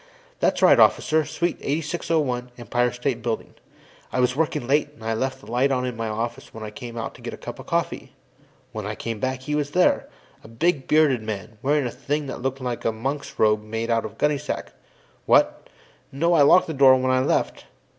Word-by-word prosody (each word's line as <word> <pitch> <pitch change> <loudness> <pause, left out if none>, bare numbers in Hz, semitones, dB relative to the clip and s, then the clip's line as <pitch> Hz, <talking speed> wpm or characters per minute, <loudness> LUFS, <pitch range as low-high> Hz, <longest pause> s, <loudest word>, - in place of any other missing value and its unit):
"That's - - +1
right, - - +7
Officer; 155 0 +4
Suite 160 +3 -2
8601, 150 -4 -1
Empire 120 0 0
State 120 -1 -2
Building. 115 -1 -3 0.6
I - - -1
was 125 0 +2
working 155 -5 0
late, 145 +3 +2
and 110 - -15
I 115 0 -1
left 130 +3 -2
the - - -15
lights 130 +3 +2
on 125 -1 0
in 125 -2 -3
my 115 0 -3
office 115 +4 -4
when 110 - -7
I 105 -1 -7
went 120 -1 -7
out 115 - -4
to - - -15
get - - -6
a - - -17
cup - - -8
of - - -11
coffee. - - -2 0.6
When - - -5
I - - -4
came 115 -2 -5
back, 130 +1 -2
he 150 +2 -3
was 150 -1 0
here 180 +4 +2 0.3
a - - -12
big, 135 +4 0
bearded 150 -6 +4
man, 105 -1 -6
wearing 145 0 +1
a 120 - -2
thing 145 +4 -3
that 130 - -6
looked 135 +1 -2
like 125 -2 -3
a - - +1
monk's 135 +6 -4
robe 105 -1 +3
made 115 +2 -3
out 115 -1 +2
of 110 +1 -8
gunny 150 -1 +1
sack. 150 - -5 0.5
What? - - +3 0.4
No, 170 +6 +1
I 160 - +5
locked 160 +6 +6
the 160 - -4
door 135 -2 +7
when 130 0 +1
I 130 - +3
left. 130 - 0
130 Hz, 215 wpm, -24 LUFS, 115-145 Hz, 0.6 s, right